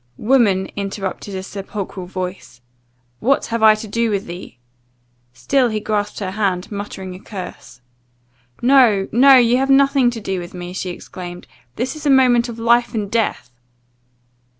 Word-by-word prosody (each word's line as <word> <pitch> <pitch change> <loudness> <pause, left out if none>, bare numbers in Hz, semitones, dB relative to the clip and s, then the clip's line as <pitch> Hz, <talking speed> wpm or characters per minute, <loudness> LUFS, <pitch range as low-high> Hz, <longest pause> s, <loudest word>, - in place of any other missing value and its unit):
"Woman," 210 -6 +3
interrupted 195 0 -5
a 190 - -4
sepulchral 195 -1 -6
voice, 185 -8 -6 0.6
"what 275 +4 +1
have 230 0 -3
I 215 -1 +7
to 215 +1 -8
do 230 +2 0
with 200 -2 -2
thee?" 175 -6 -9 0.7
Still 250 - +1
he 215 -1 -2
grasped 210 -1 -2
her 190 -2 -3
hand, 190 -3 -2
muttering 200 -2 -6
a 180 - -10
curse. 185 - -9 0.8
"No, 240 -7 +5
no; 270 +4 +7
you 245 0 +4
have 270 +1 0
nothing 275 -2 +4
to 240 -1 -5
do 190 -3 -3
with 175 +1 -9
me," 175 0 -7
she 185 0 -4
exclaimed, 175 0 -9 0.3
"this 250 +6 -3
is 305 -1 -5
a - - +3
moment 250 -3 +4
of 230 - -7
life 235 +1 +2
and 205 -2 -3
death!" 225 - -1
210 Hz, 160 wpm, -19 LUFS, 190-240 Hz, 0.8 s, I